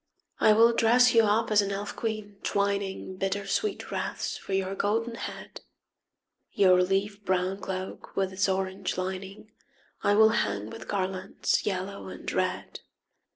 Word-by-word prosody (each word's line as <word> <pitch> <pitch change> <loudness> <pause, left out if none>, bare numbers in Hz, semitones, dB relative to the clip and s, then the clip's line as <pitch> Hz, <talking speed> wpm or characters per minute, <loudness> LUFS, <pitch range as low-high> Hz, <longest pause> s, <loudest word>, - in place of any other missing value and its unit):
I 215 - +6
will 230 +2 +6
dress 240 +2 +5
you 230 -1 +6
up 215 +2 +1
as 210 -1 +6
an 200 - -2
elf 200 +1 -4
queen, 215 -3 -4
twining 200 -2 -1
Bittersweet 195 - -2
wreaths - - -3
for 195 - -7
your 190 0 0
golden 225 +4 0
head. 230 - -7 0.9
Your 185 -2 +5
leaf 195 +2 -1
brown 185 0 0
cloak 190 -1 -6
with 190 -1 0
its 190 +1 +1
orange 190 0 -2
lining 190 +3 -5 0.5
I 205 - +3
will 220 +1 +7
hang 105 - -1
with - - -9
garlands 190 -1 -1
yellow 195 0 -3
and - - -6
red. - - -2
195 Hz, 145 wpm, -28 LUFS, 190-210 Hz, 0.9 s, will